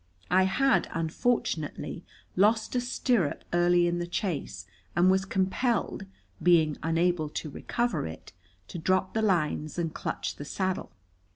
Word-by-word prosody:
I 185 +1 +5
had, 265 +8 +2
unfortunately, 165 - -1 0.3
lost 220 +3 +3
a 250 - +1
stirrup 245 - 0
early 175 0 +4
in 175 0 0
the 175 - -3
chase, 170 - -3 0.3
and 180 +2 +5
was 190 0 +2
compelled, 195 +2 0 0.3
being 160 -4 +4
unable 165 -1 +1
to 150 0 -5
recover 240 - -1
it, 80 +2 -10 0.4
to 175 - -6
drop 185 +3 +1
the 220 - +1
lines 155 -6 0
and 165 -2 -1
clutch - - -4
the - - -6
saddle. 185 +4 -2
180 Hz, 135 wpm, -28 LUFS, 165-200 Hz, 0.4 s, I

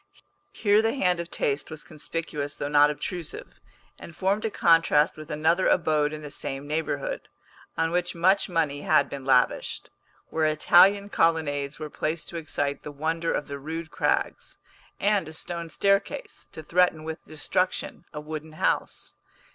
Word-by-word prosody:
Here 205 0 +3
the 225 +3 0
hand 180 -9 +2
of 170 0 -5
taste 140 -3 -1
was 155 - -7
conspicuous 150 -2 -5
though - - -3
not 145 0 +5
obtrusive, 165 +2 -6 0.4
and 170 - -11
formed 195 +4 0
a - - +1
contrast 165 -5 +4
with 155 0 -10
another 160 +4 +2
abode 150 -3 +2
in 155 0 -7
the 145 - -8
same 135 0 -4
neighbourhood, 160 - -3 0.5
on 165 0 +1
which 175 0 -1
much 190 +4 +3
money 155 -5 0
had 155 - +3
been 140 -2 -6
lavished; 125 -2 +1 0.4
where 160 -1 +2
Italian 190 +6 +5
colonnades 150 -5 +1
were 155 -2 -7
placed 155 +1 -3
to 170 - -6
excite 145 -3 -2
the 150 - -7
wonder 160 +3 -1
of - - -2
the 140 0 -6
rude 160 +3 -6
crags, - - -1 0.4
and 200 -6 +1
a - - -10
stone 170 +1 -5
staircase, 200 - -1
to 160 - -9
threaten 170 -1 +2
with 160 0 -6
destruction 175 +3 -2
a 150 - -6
wooden 155 +1 -7
house. 155 - -1
160 Hz, 160 wpm, -26 LUFS, 150-175 Hz, 0.5 s, not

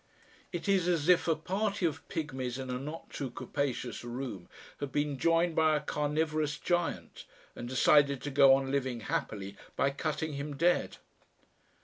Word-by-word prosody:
It - - -4
is 190 -3 +3
as 170 -4 +1
if 180 -1 +5
a 165 - +3
party 195 +4 -1
of 160 - -2
pigmies 130 -5 -3
in 130 -1 -5
a 125 - -2
not 150 +5 -7
too 135 - -4
capacious 125 -1 -3
room 120 -7 -6 0.3
had 145 -2 -4
been 145 -2 -1
joined 165 +1 +3
by 155 -1 +4
a - - +2
carnivorous 150 0 -1
giant 175 -1 -2 0.3
and 120 - -6
decided 140 +1 +4
to 145 - -3
go 135 -1 +7
on 135 0 -2
living 130 -4 -1
happily 100 -2 -3 0.2
by 140 - +2
cutting 150 +2 -2
him 140 +1 -4
dead.... 175 +3 +2
145 Hz, 160 wpm, -31 LUFS, 135-160 Hz, 0.3 s, go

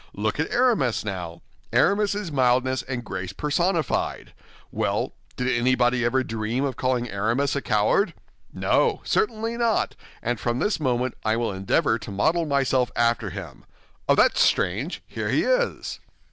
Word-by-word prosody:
Look - - -1
at - - 0
Aramis, 225 - +2
now; 90 -4 -5 0.3
Aramis 200 0 +3
is 205 -5 -4
mildness 130 -1 +2
and 130 -2 -5
grace 90 +1 -5
personified. 160 - -1 0.4
Well, - - -1 0.2
did 125 - -1
anybody 125 0 +2
ever 130 +3 +2
dream 115 +3 -2
of 135 - -2
calling 125 -1 0
Aramis 115 +7 0
a 140 - -1
coward? 110 - +2 0.4
No, - - +1
certainly 230 - 0
not, 235 -2 +1 0.3
and 120 -1 -1
from 120 +4 -1
this 205 +8 0
moment 125 -3 0
I 110 0 +2
will 115 -2 -1
endeavor 95 +4 +1
to 100 - -9
model 160 - +1
myself 135 -3 +1
after 115 -2 +1
him. 80 -12 -8 0.5
Ah! - - +6
That's - - +4
strange! 110 - +1
Here - - -4
he - - +2
is!" - - 0
125 Hz, 150 wpm, -24 LUFS, 110-155 Hz, 0.5 s, Ah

